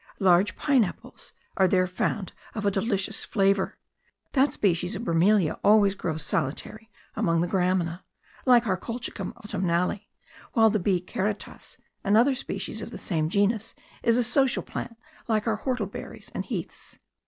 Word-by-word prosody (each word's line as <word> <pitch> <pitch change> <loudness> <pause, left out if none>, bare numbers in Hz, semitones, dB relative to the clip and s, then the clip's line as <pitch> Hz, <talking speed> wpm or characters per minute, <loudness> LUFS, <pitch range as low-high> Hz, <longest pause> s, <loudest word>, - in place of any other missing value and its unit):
Large 185 0 +4
pine 275 -5 +3
apples 190 - -8 0.3
are 190 - +5
there 185 0 +3
found 185 +2 -2 0.2
of 210 -2 -3
a 200 - +3
delicious 195 0 -1
flavour; 195 -1 +1 0.5
that 275 +1 +3
species 180 0 0
of 205 - -5
bromelia 180 -1 +2
always 205 -2 +5
grows 160 -5 -4
solitary 215 +14 -3 0.3
among 165 -1 +1
the 175 - 0
gramina, 180 -1 0 0.5
like 240 -2 +6
our 190 -4 +1
Colchicum 230 -2 -5
autumnale, 180 -1 -1 0.5
while 225 -2 +5
the 215 - +1
B. 180 -1 +1
karatas, 205 +2 -4 0.3
another 225 +7 +4
species 260 - -4
of - - -6
the - - -8
same 160 -4 -1
genus, 205 +3 0 0.3
is 230 0 +3
a 250 - +3
social 260 +2 +2
plant, 230 - -6 0.3
like 215 -2 +1
our 220 -2 0
whortleberries 255 0 -4
and - - -3
heaths. - - -6
200 Hz, 150 wpm, -26 LUFS, 180-225 Hz, 0.5 s, like